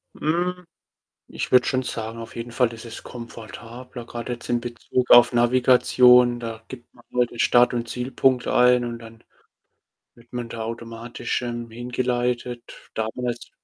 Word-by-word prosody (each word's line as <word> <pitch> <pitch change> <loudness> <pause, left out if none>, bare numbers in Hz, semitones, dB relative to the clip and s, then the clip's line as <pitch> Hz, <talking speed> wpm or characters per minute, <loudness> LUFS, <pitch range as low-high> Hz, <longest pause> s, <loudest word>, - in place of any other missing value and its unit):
Hm, 180 +3 -1 0.6
ich - - -5
würde 125 0 +6
schon 130 0 0
sagen, 115 -1 -5
auf 115 0 -9
jeden 115 0 -6
Fall 120 -1 +1
ist 115 +1 -10
es 115 - -9
komfortabler, 115 +1 -9
grad 120 +1 -7
jetzt 120 -1 -6
in 120 0 +2
Bezug 120 +1 -3
auf 120 0 +8
Navigation. 125 0 +5
Da 115 -1 -6
gibt 120 -2 -12
man 120 - -20
halt 125 -1 +2
den 120 - -11
Start 120 +1 +4
und 120 -1 -2
Zielpunkt 130 0 +1
ein 125 0 +4
und 120 -1 -5
dann 115 0 -14 0.9
wird 120 +1 -22
man 120 -1 -4
da 115 - -6
automatisch, 115 +1 -4
irgendwie 120 -1 -6
hingeleitet. 120 0 -2 0.2
Damals 120 +2 -3
120 Hz, 155 wpm, -23 LUFS, 115-125 Hz, 0.9 s, auf